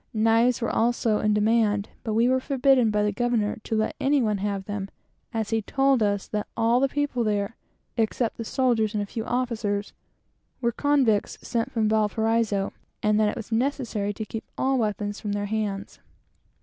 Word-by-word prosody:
Knives 225 +2 +3
also 230 -1 +1
were - - -3
in 210 0 +3
demand, 210 -1 +2
but 220 -2 -2
we 230 +2 +4
were 260 +1 +3
forbidden 265 -3 +3
by 210 0 +1
the 210 - +1
governor 230 -1 0
to 225 - -2
let 220 0 0
any 280 +1 +3
one 215 -5 +1
have 200 -1 -2
them, 205 -1 -4 0.4
as 225 -2 -2
he 225 0 +1
told 270 +3 +2
us 205 -1 0
that 210 -1 -3
all 230 +1 +3
the 275 +1 +2
people 285 -3 -1
there, 210 0 -1 0.4
except 225 +1 0
the 230 - -4
soldiers 230 -4 +1
and 205 - 0
a - - -4
few 220 +2 -5
officers, 225 -5 -2 0.7
were 235 -2 +1
convicts 260 -5 +1
sent 230 -2 -1
from 220 -2 +1
Valparaiso, 220 -1 +1 0.3
and 210 0 +3
that 215 -1 +3
it - - -4
was 230 -1 -7
necessary 230 -4 -1
to 215 +2 -5
keep 220 +1 -6
all 265 0 +1
weapons 205 -1 -2
from 205 -1 -3
their 205 0 -1
hands. 205 -1 -3
220 Hz, 185 wpm, -25 LUFS, 210-240 Hz, 0.7 s, we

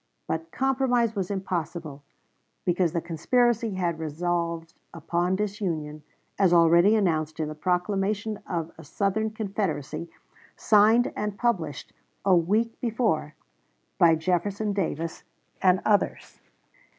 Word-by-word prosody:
But 160 +1 -3
compromise 250 -4 +1
was 190 -3 -2
impossible, 170 -6 -4 0.6
because 175 -2 +2
the 170 0 -1
conspiracy 230 +6 +1
had 170 -3 -1
resolved 170 +1 -2 0.2
upon 175 +3 0
disunion, 180 -7 -3 0.4
as 190 -3 +4
already 170 +5 +6
announced 160 -6 0
in 155 -1 -1
the - - -5
proclamation 195 +5 -1
of 170 -2 -3
a - - -10
Southern 200 +7 -1
Confederacy, 195 -7 -3 0.5
signed 220 +4 +4
and 210 -1 -3
published 175 - -2 0.3
a 190 -2 +5
week 210 +7 +1
before 220 - 0 0.6
by 165 -1 +6
Jefferson 190 +5 -1
Davis 165 -4 -3 0.4
and 185 0 +3
others. 205 -2 0
180 Hz, 115 wpm, -26 LUFS, 165-210 Hz, 0.6 s, already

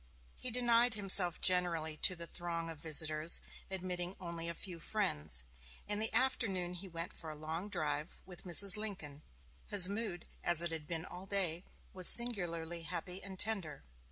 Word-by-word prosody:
He 255 - -2
denied 240 -1 +2
himself 190 -4 +5
generally 170 -4 +1
to 185 - +2
the 170 0 -4
throng 170 -1 -5
of 160 - -12
visitors, 155 +1 +1 0.3
admitting 180 -1 -4
only 170 -2 -6
a 170 - -4
few 175 -2 -6
friends. 75 - -3 0.4
In 205 0 -1
the 220 +1 -1
afternoon 215 -8 0
he 180 +2 -9
went 170 0 -7
for 160 - -9
a 155 - -8
long 160 +6 -6
drive 155 -2 -4
with 180 -2 -10
Mrs. 185 +2 +6
Lincoln. 170 -9 -7 0.5
His 195 -3 +6
mood, 200 -4 -4 0.2
as 175 -1 +5
it 170 - 0
had 160 -2 -6
been 165 0 -4
all 185 +1 -10
day, 185 -3 -2 0.3
was 185 -2 +8
singularly 175 -8 +2
happy 180 +3 -6
and 190 -1 -7
tender. 185 -10 0
175 Hz, 165 wpm, -34 LUFS, 165-195 Hz, 0.5 s, was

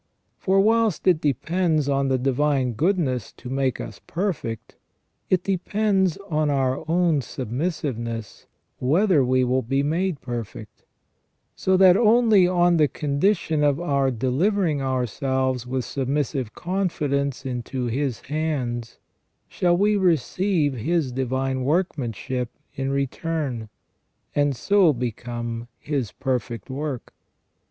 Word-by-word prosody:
For 195 +1 +2
whilst 220 -1 +2
it 175 -4 +4
depends 155 +2 +1
on 140 -1 +1
the 130 -1 +2
divine 135 0 +1
goodness 140 - 0
to 125 - -9
make 135 -2 0
us 110 - -7
perfect, 165 - -3 0.5
it 180 -1 +2
depends 195 -1 +1
on 155 -3 +1
our 135 -2 0
own 170 -3 +3
submissiveness 120 - -4 0.3
whether 160 +3 +3
we 130 0 +2
will 130 +1 +1
be 135 +4 0
made 165 +1 0
perfect; 115 -4 -7 0.7
so 190 0 +2
that 185 -1 +7
only 220 -4 +5
on 175 -1 +3
the 150 -2 +4
condition 150 +2 0
of 145 0 +2
our 140 -5 +1
delivering 145 - +1
ourselves 130 0 -1
with 130 0 -2
sub 135 -2 -3
missive 135 -4 -1
confidence 145 -8 -1
into 125 0 -3
His 125 +1 -2
hands 130 -6 -3 0.5
shall 175 -1 +1
we 205 +2 +3
receive 175 -2 +1
His 145 +3 0
divine 130 +1 -1
workmanship 130 - -1 0.2
in 135 0 -3
return, 140 - -2 0.6
and 145 -1 +2
so 190 - +4
become 120 -1 -4
His 135 -9 -3
perfect 120 0 -3
work. 140 -2 -4
140 Hz, 120 wpm, -24 LUFS, 125-175 Hz, 0.7 s, that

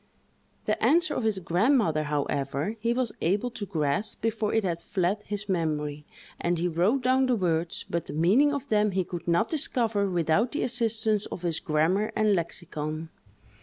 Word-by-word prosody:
The - - -1
answer 315 -1 +3
of 245 - -2
his 215 -3 +1
grandmother, 180 - +2
however, 145 +4 -2
he 230 +2 0
was 245 -1 0
able 205 +8 +1
to 210 -4 -6
grasp 155 +3 -1
before 220 -1 0
it 225 - +1
had 170 -3 -2
fled 195 +1 -1
his 210 0 -4
memory, 150 -5 -2 0.3
and 175 0 0
he 175 +2 0
wrote 185 +11 +1
down 260 +1 +3
the 250 - +3
words; 170 -4 -1
but 170 -2 -3
the - - -6
meaning 200 - +4
of 285 -1 -4
them 210 -1 +3
he 190 0 +1
could 175 -1 -7
not 170 +6 +2
discover 230 -9 0
without 175 - +1
the 295 - -1
assistance 225 -3 +1
of 180 - -7
his 170 -2 0
grammar 165 +8 +1
and 215 -1 +3
lexicon. 160 -3 -4
195 Hz, 175 wpm, -27 LUFS, 165-225 Hz, 0.3 s, meaning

